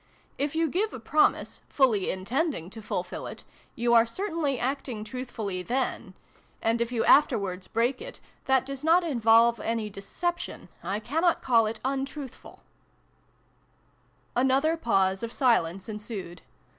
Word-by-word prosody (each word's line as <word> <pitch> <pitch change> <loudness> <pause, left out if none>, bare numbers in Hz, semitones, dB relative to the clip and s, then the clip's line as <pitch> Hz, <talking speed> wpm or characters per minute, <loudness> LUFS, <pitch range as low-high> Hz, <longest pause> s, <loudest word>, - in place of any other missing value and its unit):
If 285 +2 -1
you 325 0 +2
give 400 +8 0
a - - -7
promise, 300 +7 +1
fully 235 -9 +2
intending 200 - -2
to 220 - -9
fulfil - - -4
it, - - -9 0.3
you 240 -2 +1
are 230 0 +6
certainly 320 - -1
acting 255 -4 -3
truthfully 220 -5 -4
then; 250 +6 -2 0.4
and, 230 +1 +1
if 235 +1 -1
you 235 -2 0
afterwards 200 -10 +3
break 235 - 0
it, - - -9 0.3
that 265 -1 +3
does 275 +1 -6
not 335 +3 +5
involve 235 -5 +4
any 225 -2 -2
deception. 345 - -4
I 200 +2 -2
cannot 325 +10 +1
call 230 -4 +4
it 220 +1 -4
untruthful" 270 0 -5 1.7
Another 265 +6 +3
pause 195 - +1
of 230 -1 -4
silence 195 -9 +1
ensued. 210 -5 -7
240 Hz, 135 wpm, -27 LUFS, 215-280 Hz, 1.7 s, are